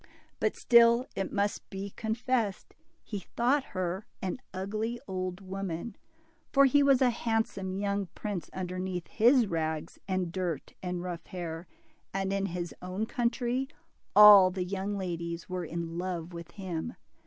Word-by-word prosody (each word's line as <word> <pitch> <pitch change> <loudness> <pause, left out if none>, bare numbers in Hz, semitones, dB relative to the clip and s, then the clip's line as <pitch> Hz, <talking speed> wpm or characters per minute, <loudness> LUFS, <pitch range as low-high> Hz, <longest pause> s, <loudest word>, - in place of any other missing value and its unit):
But - - +1
still, 235 +1 +6
it 195 -1 -2
must 205 0 -1
be 195 0 -5
confessed, 225 -1 -1 0.3
he 205 - -4
thought 250 +9 +1
her 185 +2 -2
an 190 +5 -3
ugly 215 +5 -3
old 185 0 -3
woman, 195 +1 -4 0.6
for 275 -1 +6
he 285 +2 +5
was 275 -2 +5
a 250 - +4
handsome 225 -5 -1
young 200 0 -1
prince 195 -7 -4
underneath 185 -1 -3
his 240 +2 +4
rags 160 -3 -3
and 185 -3 -1
dirt 175 -5 -3
and 180 -1 -3
rough 175 -2 -5
hair. 170 -2 -5
DIMPLE. 320 - -10
57 - - 0
and 195 0 -1
in 195 0 0
his 175 -1 -4
own 185 +4 -3
country, 240 +3 0 0.5
all 205 -3 +10
the 185 0 -3
young 195 +2 -2
ladies 170 -2 -4
were 180 -1 -3
in 170 +1 -4
love 175 -2 -4
with 170 -1 -8
him. 190 +3 -4
190 Hz, 155 wpm, -30 LUFS, 180-225 Hz, 0.6 s, all